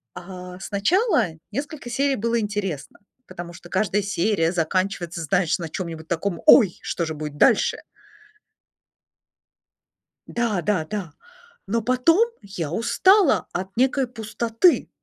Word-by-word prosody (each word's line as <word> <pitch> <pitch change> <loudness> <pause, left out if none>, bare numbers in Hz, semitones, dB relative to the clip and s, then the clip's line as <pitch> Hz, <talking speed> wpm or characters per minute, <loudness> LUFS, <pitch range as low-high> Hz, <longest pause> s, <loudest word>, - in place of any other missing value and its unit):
А, 180 0 -9
сначала 290 - +1 0.2
несколько 280 +1 -5
серий 275 +2 +1
было 230 +2 0
интересно, 205 -8 -4 0.3
потому 175 0 -8
что 175 0 -13
каждая 200 +2 +1
серия 195 -3 0
заканчивается, 175 0 -1
знаешь, 170 +1 +1
на 165 -2 -5
чём-нибудь 165 -2 -6
таком: 170 +1 -2
ой, 200 -10 +7
что 170 - -2
же 160 - -4
будет 150 -1 -6
дальше? - - +4 2.5
Да 225 -7 -1
да 180 -2 0
да! 185 -2 -5 0.6
Но 230 +3 0
потом 330 - +3
я 175 -6 -5
устала 370 - +3
от 190 +2 -5
некой 260 +2 +2
пустоты. 230 - +1
200 Hz, 120 wpm, -23 LUFS, 175-235 Hz, 2.5 s, ой